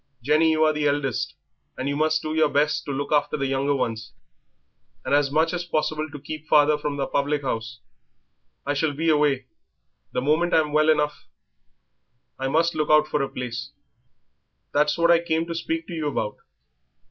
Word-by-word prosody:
Jenny, 155 +4 +3
you 155 0 +2
are 155 0 +3
the 150 -1 0
eldest 140 -4 -1 0.4
and 140 +2 -2
must 155 +1 +1
do 155 - -3
your 155 -1 +3
best 150 +1 +1
to 145 - -4
look 140 +1 -3
after 150 0 +1
the 140 - -1
younger 135 +1 0
ones, 115 -4 -3 0.9
and - - -1
as 145 -1 +3
much 160 +4 +1
as 175 0 -2
possible 155 -2 -2
to 145 0 -9
keep 155 +2 -8
father 150 0 +5
from 150 -1 -4
the 135 - -1
public 145 +1 -1
house. 115 -2 -4 0.8
I 145 - 0
shall 145 +1 0
be 160 +3 0
away; 145 -3 +2 0.7
the - - -1
moment 155 +6 +1
I'm 150 -2 +2
well 155 +1 +4
enough 150 -1 0 1.1
I 135 - -1
must 165 +4 +2
look 155 -1 -1
out 150 0 +5
for 150 - 0
a 135 - -1
place." 125 -2 -6 1.0
"That's 150 +1 +3
just - - -6
what 170 0 +4
I 170 - +6
came 160 -1 0
to 170 - -5
speak 325 - -3
to 175 - -8
you 160 -2 -2
about. 110 -7 -2
150 Hz, 190 wpm, -24 LUFS, 140-155 Hz, 1.1 s, I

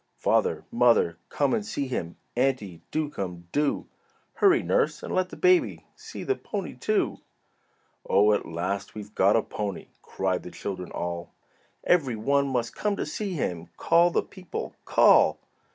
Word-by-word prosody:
"Father! 460 - +1
Mother! 460 -1 +3
Come - - +1
and 220 -3 0
see 175 -10 -3
him!" 85 -10 -4 0.2
"Auntie, 120 -9 0
do 155 -1 -1
come! 90 -10 -6
do!" 145 0 0 0.5
"Hurry, 370 -3 +4
nurse, - - +1
and - - -4
let 185 -1 +1
the - - -9
baby 365 -1 +3
See - - -9
the 400 - +1
pony, 200 - -5
too." 210 +12 0 0.9
"Oh, 105 +2 +5
at - - -1
last 90 +4 -3
we've 105 0 -8
got 100 +2 +4
a 115 - +3
pony," 100 -3 -5
Cried 95 -1 -2
the - - -9
children 90 -1 -6
all. 85 0 -4 0.5
"Every 140 -9 +2
one 140 +6 +1
must 120 -3 -1
come 210 -1 -1
to - - -3
see 205 -3 -4
him, 90 - -3
Call 170 +1 +4
the - - +1
people! 185 -3 -7
call!" - - +5
130 Hz, 160 wpm, -26 LUFS, -, 0.9 s, Oh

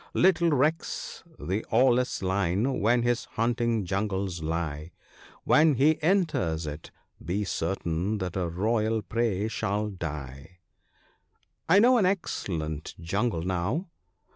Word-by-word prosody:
Little 175 -2 +4
recks 155 +2 -1
the 95 +4 -2
awless 125 -1 +3
lion 100 +7 0
where 120 +4 +3
his 120 0 0
hunting 115 -2 0
jungles 95 -2 -2
lie 80 0 -3 0.2
— - - -23
When 155 -1 +4
he 150 +5 +3
enters 155 - +1
it 75 +1 -7 0.3
be 95 +6 -1
certain 95 0 -2
that 90 -3 -4
a 90 -3 -1
royal 110 +4 0
prey 105 0 -1
shall 105 -1 -2
die." 75 -2 -7 0.5
' - - -34
I 185 - +6
know 245 +4 +6
an 190 - +3
excellent 80 - -3
jungle 95 +1 -1
now.' 95 - -2
105 Hz, 125 wpm, -27 LUFS, 85-125 Hz, 0.5 s, I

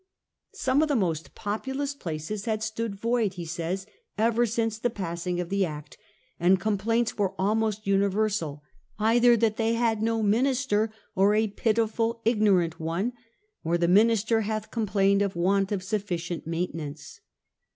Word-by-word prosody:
Some 270 -6 +2
of 315 - +2
the 290 - +1
most 165 - -1
populous 265 +7 -3
places 185 - -5
had 220 -2 -1
stood 220 -1 -3
void, 225 -1 0
he 175 -2 -6
says, 170 +4 -3 0.3
ever 230 +2 +2
since 225 0 -1
the 245 - +1
passing 175 -3 -3
of 175 -1 -3
the 200 0 +1
Act, 150 -4 -6 0.4
and 180 +2 +4
complaints 220 +4 0
were 195 -2 -1
almost 215 +1 0
uni 195 0 +3
versal, 195 -8 -1 0.4
'either 235 +2 +4
that 220 -1 +1
they 225 0 +1
have 230 -2 +1
no 225 0 +1
minister, 225 0 +1 0.2
or 200 +1 +3
a 220 +1 +3
pitiful 225 +2 0
ignorant 195 -8 +2
one, 170 +9 -2 0.5
or 170 +2 +1
the 170 0 +1
minister 225 +3 +4
hath 215 0 -3
complained 200 -2 +2
of 200 -2 -1
want 195 +3 +1
of 195 -3 -1
sufficient 180 -5 -3
maintenance. 165 -3 -5
210 Hz, 150 wpm, -27 LUFS, 180-225 Hz, 0.5 s, and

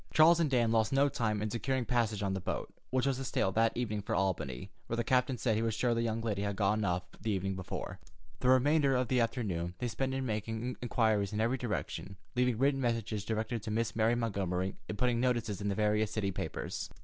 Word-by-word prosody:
Charles 165 +2 +6
and 160 -3 +2
Dan 120 -4 +2
lost 110 -1 +2
no 140 +1 +4
time 110 -5 -1
in 105 - -2
securing 130 +2 -1
passage 110 -3 0
on 95 -1 0
the 95 - -1
boat, - - -4 0.2
which 130 0 +1
was 135 -2 +1
to 135 - -4
sail 95 -6 0
that 115 +3 +2
evening 110 -4 -1
for 100 - -2
Albany, 90 -4 -1 0.2
where 115 - -2
the 120 - +1
captain 130 +1 +2
said 115 -2 +1
he 110 - +1
was 115 -2 0
sure 120 +1 +2
the 115 - 0
young 115 -1 -1
lady 105 -3 -1
had 100 -1 -1
gotten 105 +1 +1
off 90 -2 0 0.2
the 110 - -2
evening 95 -1 -1
before. 95 -1 -5 0.4
The 125 - +2
remainder 140 +2 +4
of 125 -2 0
the 130 - +3
afternoon 95 -7 -1
they 125 - -2
spent 130 +3 -2
in 135 0 -2
making 115 +2 -3
inquiries 110 -4 +1
in 105 - -1
every 120 +4 +1
direction, 105 -4 -4 0.2
leaving 125 -2 +2
written 135 +2 +2
messages 115 -4 -1
directed 110 +2 -2
to 105 - -6
Miss 115 +1 -1
Mary 115 +1 +3
Montgomery, 95 -5 -1
and 105 - -3
putting 125 0 +2
notices 120 -5 0
in 100 - -1
the 100 - -1
various 105 0 +2
city 105 -3 -1
papers. 90 - -4
115 Hz, 230 wpm, -32 LUFS, 105-125 Hz, 0.4 s, Charles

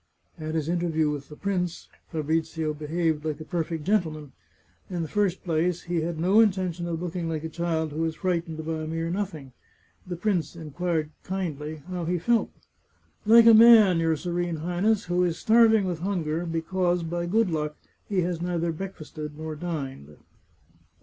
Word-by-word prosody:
At 155 0 -4
his 155 -2 -1
interview 165 -3 +1
with 145 -2 -6
the 150 - -10
prince, 180 -2 -2 0.2
Fabrizio 160 0 -1
behaved 155 +1 -1
like 155 -1 -3
a - - -6
perfect 165 -1 -3
gentleman. 160 -7 0 0.6
In 175 -2 -2
the - - -4
first 195 0 0
place, 170 0 0
he 170 -1 -1
had 165 0 -3
no 190 +6 +4
intention 185 -5 +2
of 165 -1 -2
looking 175 -1 -3
like 160 -1 -3
a 160 - -4
child 160 -2 -1
who 155 +2 -2
is 160 -1 -2
frightened 165 -3 -2
by 160 -1 -2
a 155 - -4
mere 165 +1 -2
nothing. 175 -8 -4 0.6
The 180 - -3
prince 175 -2 -1
inquired 160 0 -2
kindly 155 -5 -4
how 180 -2 -4
he 175 +2 0
felt. 230 +7 +2 0.4
" - - -39
Like 230 +1 +8
a 230 - +9
man, 220 -5 +8
your 165 -1 +2
Serene 175 +1 -2
Highness, 180 +7 0
who 180 +1 +1
is 170 -2 0
starving 220 -2 +5
with 175 -3 -2
hunger, 170 -3 -2
because, 175 +2 0
by 170 +1 -3
good 215 +1 +2
luck, 150 -1 -2 0.3
he 195 -3 +1
has 175 -1 -2
neither 170 -1 -1
break 190 +4 -6
fasted 150 -1 -8
nor 155 0 -5
dined." 135 - -5
170 Hz, 175 wpm, -26 LUFS, 155-180 Hz, 0.6 s, a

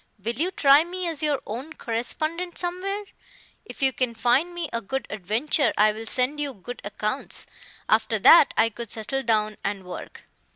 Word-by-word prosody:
Will 215 +4 -3
you 325 +9 -1
try 290 -5 +5
me 360 +1 -4
as 325 -3 -3
your 295 -3 +1
Own 260 +9 -6
Correspondent 310 +10 -3
somewhere? 375 +3 -3 0.6
If - - -7
you 265 -1 +4
can 245 -2 -1
find 250 +9 +2
me 345 -2 -3
a 230 - -1
good 265 +6 -3
adventure 220 - 0
I 215 +1 +5
will 220 +1 -8
send 260 +5 0
you 285 -2 -2
good 245 +5 -9
accounts. 215 +5 -3 0.4
After 220 0 +2
that 280 +8 +8
I 225 - +4
could 230 +1 -8
settle 225 +6 -3
down 215 -3 +1
and 200 -1 -2
work." 180 - -9
255 Hz, 175 wpm, -25 LUFS, 220-310 Hz, 0.6 s, that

